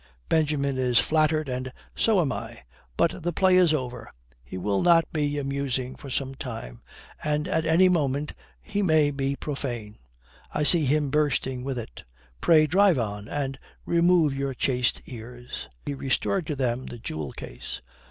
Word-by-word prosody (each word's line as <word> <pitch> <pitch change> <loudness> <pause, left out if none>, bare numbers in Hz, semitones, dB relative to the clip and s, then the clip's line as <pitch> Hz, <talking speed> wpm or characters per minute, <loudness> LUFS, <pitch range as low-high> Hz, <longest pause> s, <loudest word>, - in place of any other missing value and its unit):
Benjamin 145 -4 +1
is 125 -2 +2
flattered 155 +4 +3
and 130 0 -3 0.2
so 215 -5 +3
am 145 -5 0
I. - - -6 0.3
But - - +1
the 175 - -1
play 185 +2 +3
is 180 -3 +5
over. 130 -5 -3 0.3
He 65 +8 -8
will 100 +2 0
not 170 -2 +5
be 145 -2 0
amusing 135 -2 -2
for 140 - -10
some 135 +1 -2
time, 110 - -7 0.4
and 150 0 0
at 160 0 0
any 170 +4 +5
moment 150 -4 0 0.3
he 205 -1 -2
may 155 -6 +4
be 135 0 -1
profane. 120 -8 -5 0.5
I 150 - 0
see 160 0 +5
him 145 0 +1
bursting 130 -4 0
with 135 -1 -3
it. 110 - -7 0.4
Pray 155 -2 +6
drive 185 +2 +4
on 105 -3 -3
and 135 0 -3 0.3
remove 170 -3 +4
your 135 -1 -2
chaste 125 -1 0
ears." 120 +1 -8 0.2
He 145 - -2
restored 145 +6 -1
to 150 - -2
them 130 -1 -1
the 120 - -7
jewel 80 - -5
case. - - -8
140 Hz, 160 wpm, -26 LUFS, 125-155 Hz, 0.5 s, Pray